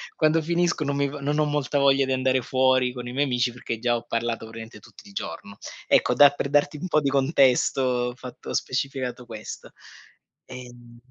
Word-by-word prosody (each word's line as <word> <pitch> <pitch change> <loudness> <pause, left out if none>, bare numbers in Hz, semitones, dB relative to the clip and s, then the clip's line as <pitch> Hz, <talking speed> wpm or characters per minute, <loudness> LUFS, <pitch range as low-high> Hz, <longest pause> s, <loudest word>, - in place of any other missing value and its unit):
quando 155 +1 +2
finisco 170 0 0
non 140 0 -2
mi 140 0 +1
v 145 - -9
non 145 +2 -1
ho 150 - +3
molta 145 -1 -1
voglia 135 0 +4
di 135 - -3
andare 130 0 +1
fuori 130 0 +2
con 125 -1 -7
i 120 - -6
miei 145 +2 +1
amici 125 -1 0
perché 115 -2 -5
già 120 0 +1
ho 120 - -4
parlato 115 -1 -2
praticamente 115 -1 -10
tutti 205 - -17
il 200 - -15
giorno. 100 - -7 0.3
Ecco, 125 - +3
da 145 +1 +8
per 140 -1 -4
darti 145 +1 +2
un 185 - -5
po' 155 - +3
di 140 - 0
contesto, 135 -1 +3
ho 125 -1 0
fatto 125 -1 -10
ho - - -4
specificato 130 -2 -3
questo. 110 -2 -9 0.7
Ehm 120 -2 -12
130 Hz, 205 wpm, -24 LUFS, 120-145 Hz, 0.7 s, da